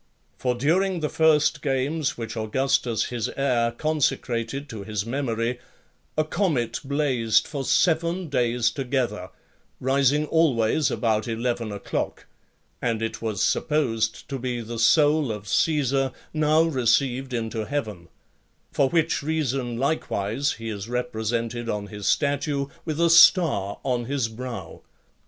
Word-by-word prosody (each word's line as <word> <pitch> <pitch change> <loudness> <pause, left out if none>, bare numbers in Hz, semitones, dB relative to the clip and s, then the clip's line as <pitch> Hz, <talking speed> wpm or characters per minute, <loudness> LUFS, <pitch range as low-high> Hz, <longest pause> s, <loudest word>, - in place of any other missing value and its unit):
For 125 -1 -1
during 175 +7 +1
the 150 - -1
first 155 -2 +3
games 140 +2 -1
which 115 -1 -5
Augustus, 115 0 0
his 115 -3 -2
heir, 125 -4 +2
consecrated 135 -2 -1
to 110 -3 -7
his 105 0 -3
memory, 120 -1 -2 0.6
a 155 - +4
comet 150 - -1
blazed 130 -6 +1
for 140 -3 -4
seven 170 +3 +1
days 120 -4 +1
together, 125 -8 -2 0.5
rising 140 +3 +2
always 145 -4 +2
about 110 -1 0
eleven 115 -1 -2
o'clock; 100 -1 -4 0.6
and 115 -2 0
it 115 0 -4
was 110 -4 -1
supposed 115 -8 0
to 135 -2 -3
be 125 -1 -3
the 115 0 -6
soul 145 +3 +4
of 105 -1 -7
Caesar, 135 0 +1 0.2
now 155 +1 +3
received 130 -2 +1
into 115 -2 -3
heaven: 105 -9 -4 0.6
for 135 - +2
which 165 0 +1
reason, 135 -5 -1
likewise, 135 -3 -1
he 115 0 -7
is 105 0 -6
represented 120 -1 -2
on 105 -2 -2
his 105 -1 -6
statue 140 -1 +1 0.2
with 155 -1 -3
a 170 -1 +4
star 160 - +5
on 125 -3 -1
his 130 -3 -1
brow. 115 -6 -7
125 Hz, 130 wpm, -24 LUFS, 115-145 Hz, 0.6 s, star